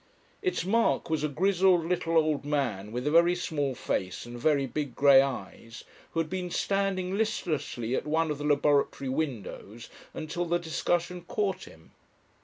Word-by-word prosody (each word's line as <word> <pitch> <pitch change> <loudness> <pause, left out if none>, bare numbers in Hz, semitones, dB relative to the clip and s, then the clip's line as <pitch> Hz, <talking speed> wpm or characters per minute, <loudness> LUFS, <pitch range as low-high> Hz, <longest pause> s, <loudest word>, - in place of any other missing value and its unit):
Its 370 - -1
mark 225 -4 +1
was 155 -2 0
a - - +2
grizzled 180 +2 +3
little 165 -1 0
old 155 -3 +2
man 125 -9 -2
with 125 +3 -4
a 150 - +1
very 170 +2 +5
small 145 -6 -2
face 90 -4 -3
and 120 0 -8
very 140 +1 +2
big 140 -1 -4
grey 140 -1 +7
eyes, 120 -3 -5 0.3
who 165 - 0
had 165 - 0
been 180 +1 -4
standing 195 0 -1
listlessly 165 - -2
at 150 - -3
one 160 +1 +1
of 145 - -4
the - - -4
laboratory 145 -2 +2
windows 120 -5 -4 0.3
until 160 +3 -3
the 175 +1 +1
discussion 175 +1 -1
caught 195 -1 -2
him. 80 0 -17
155 Hz, 165 wpm, -28 LUFS, 135-175 Hz, 0.3 s, grey